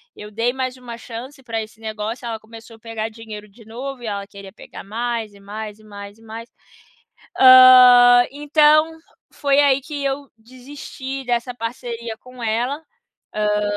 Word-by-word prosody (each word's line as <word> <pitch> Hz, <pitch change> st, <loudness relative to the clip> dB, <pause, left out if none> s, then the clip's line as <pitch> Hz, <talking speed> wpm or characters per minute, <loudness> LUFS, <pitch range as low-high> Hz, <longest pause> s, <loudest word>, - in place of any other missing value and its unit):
Eu 210 Hz, 0 st, -11 dB
dei 230 Hz, +3 st, -1 dB
mais 260 Hz, -1 st, -4 dB
uma 240 Hz, -2 st, -9 dB
chance 250 Hz, +4 st, -10 dB
pra 225 Hz, -2 st, -3 dB
esse 220 Hz, +1 st, -12 dB
negócio, 220 Hz, +2 st, -5 dB
ela 225 Hz, -1 st, -4 dB
começou 225 Hz, +1 st, -14 dB
a -, -, -27 dB
pegar 225 Hz, 0 st, -5 dB
dinheiro 215 Hz, -2 st, -11 dB
de 220 Hz, +2 st, -19 dB
novo 255 Hz, +3 st, -7 dB
e 240 Hz, -, -8 dB
ela 200 Hz, -1 st, -4 dB
queria 200 Hz, -1 st, -13 dB
pegar -, -, -12 dB
mais 225 Hz, 0 st, -4 dB
e 200 Hz, -, -18 dB
mais 210 Hz, +1 st, -8 dB
e 215 Hz, -, -19 dB
mais 205 Hz, 0 st, -11 dB
e 225 Hz, -, -22 dB
mais. 225 Hz, +2 st, -10 dB, 0.9 s
Hã, 250 Hz, -1 st, +8 dB
então, 300 Hz, +2 st, +3 dB, 0.4 s
foi 280 Hz, 0 st, +1 dB
aí 275 Hz, -1 st, +3 dB
que 290 Hz, 0 st, -6 dB
eu 275 Hz, 0 st, -3 dB
desisti 265 Hz, +3 st, -9 dB
dessa 245 Hz, 0 st, -1 dB
parceria 230 Hz, -1 st, -6 dB
com 255 Hz, -1 st, -12 dB
ela, 245 Hz, +8 st, -2 dB, 0.5 s
hã 210 Hz, 0 st, 0 dB
235 Hz, 165 wpm, -20 LUFS, 220-260 Hz, 0.9 s, Hã